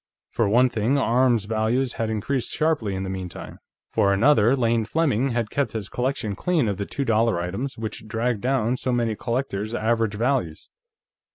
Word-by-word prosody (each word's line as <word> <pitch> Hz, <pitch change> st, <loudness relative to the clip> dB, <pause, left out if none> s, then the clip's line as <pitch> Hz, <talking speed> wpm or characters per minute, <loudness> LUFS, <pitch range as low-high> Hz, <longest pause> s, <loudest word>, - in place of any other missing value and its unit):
For 110 Hz, -3 st, +1 dB
one 125 Hz, +4 st, +5 dB
thing, 120 Hz, +3 st, 0 dB
arms 120 Hz, -4 st, +2 dB
values 115 Hz, +4 st, 0 dB
had 115 Hz, -1 st, -2 dB
increased 115 Hz, +4 st, -2 dB
sharply 150 Hz, -11 st, 0 dB
in 95 Hz, -, -3 dB
the 95 Hz, -, -4 dB
meantime. 95 Hz, -2 st, -7 dB, 0.3 s
For 100 Hz, -, +2 dB
another, 115 Hz, +3 st, +4 dB
Lane 115 Hz, -3 st, +1 dB
Fleming 135 Hz, 0 st, +1 dB
had 115 Hz, -3 st, -2 dB
kept 140 Hz, -1 st, -1 dB
his 105 Hz, -3 st, -4 dB
collection 125 Hz, -4 st, -2 dB
clean 160 Hz, -, 0 dB
of 100 Hz, -2 st, -1 dB
the 100 Hz, -, -4 dB
two 140 Hz, -, -3 dB
dollar 115 Hz, -5 st, +2 dB
items 95 Hz, +11 st, -4 dB
which 110 Hz, -1 st, -5 dB
dragged 115 Hz, 0 st, -1 dB
down 125 Hz, -1 st, +1 dB
so 130 Hz, -, -2 dB
many 120 Hz, -3 st, 0 dB
collectors' 115 Hz, -3 st, -3 dB
average 115 Hz, -2 st, 0 dB
values. 115 Hz, -, -1 dB
115 Hz, 175 wpm, -24 LUFS, 105-130 Hz, 0.3 s, one